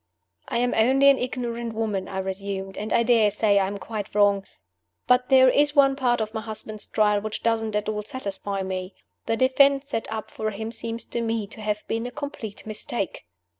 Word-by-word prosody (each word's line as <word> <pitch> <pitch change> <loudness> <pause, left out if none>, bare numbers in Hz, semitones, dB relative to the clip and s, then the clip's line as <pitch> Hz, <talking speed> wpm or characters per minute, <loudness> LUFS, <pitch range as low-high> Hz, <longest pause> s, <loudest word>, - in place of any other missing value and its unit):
"I - - -1
am 245 +1 +1
only 265 +5 +5
an 275 - 0
ignorant 235 -2 -3
woman," 210 -4 -2
I 190 - -6
resumed, 195 0 -4
"and 210 +1 -5
I 235 - +4
dare 230 -3 +4
say 205 0 +3
I 190 - +1
am 200 +1 -4
quite 210 -1 -6
wrong; 200 -1 +4 0.6
but 250 0 +3
there 260 -1 +7
is 290 +3 +3
one 275 -1 +5
part 245 -4 +1
of 215 0 -3
my 220 - -3
husband's 215 -1 -6
trial 210 -1 +2
which 215 0 -5
doesn't 225 -2 0
at 210 0 -1
all 215 -1 -1
satisfy 200 -3 -4
me. 185 0 -4 0.3
The 225 - +1
defense 275 +2 +4
set 225 - -3
up 220 -1 -5
for 215 - -2
him 220 +2 -5
seems 230 0 -6
to 235 - -3
me 225 -2 -1
to 215 - -12
have 210 0 -2
been 230 +2 -2
a - - -7
complete 275 -8 -7
mistake." 215 - -4
220 Hz, 205 wpm, -25 LUFS, 205-245 Hz, 0.6 s, there